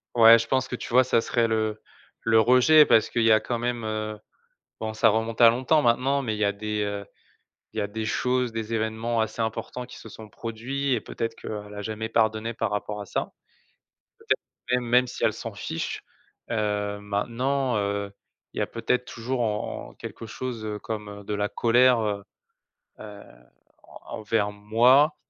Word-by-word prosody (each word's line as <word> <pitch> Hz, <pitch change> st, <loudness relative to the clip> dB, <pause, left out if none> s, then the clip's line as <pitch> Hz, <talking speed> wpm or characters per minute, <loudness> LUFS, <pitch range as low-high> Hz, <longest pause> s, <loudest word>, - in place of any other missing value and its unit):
Ouais. 115 Hz, -1 st, +9 dB
Je 115 Hz, -, -3 dB
pense 130 Hz, 0 st, +1 dB
que, 125 Hz, -, -4 dB
tu -, -, -7 dB
vois, 130 Hz, +1 st, +7 dB
ça 120 Hz, -2 st, +2 dB
serait 115 Hz, 0 st, +1 dB
le 110 Hz, -1 st, -1 dB, 0.4 s
le 110 Hz, 0 st, +4 dB
rejet 125 Hz, +7 st, +6 dB
parce 110 Hz, -, +4 dB
qu'il 115 Hz, -, 0 dB
y 115 Hz, -, +5 dB
a, 110 Hz, -, +6 dB
quand 120 Hz, +2 st, -3 dB
même, 120 Hz, 0 st, -2 dB
heu, 110 Hz, -1 st, -3 dB, 0.6 s
bon, 110 Hz, 0 st, -3 dB
ça 110 Hz, -, +4 dB
remonte 115 Hz, +2 st, -2 dB
à 115 Hz, -, +10 dB
longtemps 130 Hz, +6 st, +2 dB
maintenant, 130 Hz, +4 st, +2 dB
mais 110 Hz, -4 st, -2 dB
il -, -, -7 dB
y 105 Hz, -, +2 dB
a 100 Hz, -, +1 dB
des, 105 Hz, +1 st, -3 dB
heu, 100 Hz, 0 st, -4 dB, 0.7 s
il -, -, -11 dB
y -, -, +1 dB
a 100 Hz, -, -1 dB
des 110 Hz, +2 st, -5 dB
choses, 125 Hz, +2 st, 0 dB
des 115 Hz, 0 st, -4 dB
évènements 110 Hz, +1 st, -1 dB
assez 110 Hz, +1 st, -3 dB
importants 115 Hz, +2 st, -4 dB
qui 125 Hz, -, -12 dB
se 110 Hz, -, -11 dB
sont 110 Hz, +1 st, -11 dB
produits 120 Hz, +6 st, -4 dB
et 120 Hz, -, +1 dB
peut-être 115 Hz, +1 st, -4 dB
qu'elle 105 Hz, -1 st, -7 dB
a 105 Hz, -, -6 dB
jamais 110 Hz, +1 st, -4 dB
pardonné 110 Hz, 0 st, +1 dB
par 115 Hz, -1 st, -2 dB
rapport 105 Hz, 0 st, -3 dB
à 100 Hz, -, -6 dB
ça. -, -, -3 dB, 0.9 s
Peut-être, -, -, -1 dB, 0.4 s
même -, -, -6 dB
même 125 Hz, +1 st, +5 dB
si 125 Hz, -, -6 dB
elle -, -, +3 dB
s'en -, -, -7 dB
fiche, -, -, -4 dB, 0.5 s
heu, 105 Hz, -2 st, -1 dB
maintenant, 120 Hz, +5 st, -1 dB
heu, 100 Hz, 0 st, -2 dB, 0.4 s
il -, -, -11 dB
y -, -, +1 dB
a -, -, +2 dB
peut-être 125 Hz, 0 st, -1 dB
toujours 125 Hz, +2 st, -3 dB
en 105 Hz, -, -3 dB
en -, -, -17 dB
quelque -, -, -8 dB
chose, 120 Hz, -1 st, -5 dB
heu, 105 Hz, -1 st, -4 dB
comme 105 Hz, -2 st, -6 dB
de 105 Hz, -, -3 dB
la 105 Hz, 0 st, 0 dB
colère, 120 Hz, +1 st, +4 dB
heu 105 Hz, -2 st, -2 dB, 0.8 s
heu, 105 Hz, -1 st, -10 dB, 0.6 s
en -, -, -14 dB, 0.2 s
envers 105 Hz, -1 st, 0 dB
moi 120 Hz, +9 st, +4 dB
110 Hz, 195 wpm, -26 LUFS, 105-120 Hz, 0.9 s, à